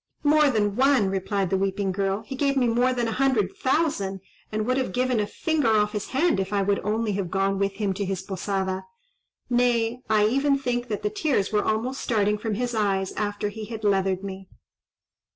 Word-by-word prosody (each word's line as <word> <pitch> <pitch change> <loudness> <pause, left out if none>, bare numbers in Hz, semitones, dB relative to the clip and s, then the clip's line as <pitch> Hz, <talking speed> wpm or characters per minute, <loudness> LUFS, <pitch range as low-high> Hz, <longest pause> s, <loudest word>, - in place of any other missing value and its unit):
"More 300 0 +5
than 205 -5 +1
one!" 260 -6 +3
replied 195 -1 -1
the 190 - +3
weeping 195 0 0
girl; 195 +2 -1
"he 270 - -6
gave 275 0 +1
me 255 - +3
more 245 +2 +2
than 240 -2 -1
a - - -1
hundred 235 -6 +1
thousand, 260 - 0 0.3
and 215 0 -1
would 255 +2 +1
have 255 -8 -1
given 250 -2 +1
a 205 - 0
finger 315 -1 0
off 210 -1 +3
his 210 -1 -4
hand 270 - +1
if 190 +1 -2
I 200 -1 +1
would 200 0 +1
only 215 +2 -1
have 195 -3 -2
gone 195 +1 0
with 200 0 0
him 200 -1 -1
to 200 +2 -3
his 190 -1 -3
posada; 190 -1 -3 0.6
nay, 240 -1 +1
I 215 -1 +4
even 275 +5 +2
think 245 -2 -2
that 210 -3 -4
the 210 - 0
tears 215 -4 0
were 210 - +2
almost 240 +5 -1
starting 210 -2 +1
from 215 -1 -2
his 245 +2 -2
eyes 195 -3 0
after 205 0 -2
he 215 +1 -7
had 220 0 -7
leathered 195 -2 +1
me." 190 -1 -7
210 Hz, 205 wpm, -25 LUFS, 195-245 Hz, 0.6 s, More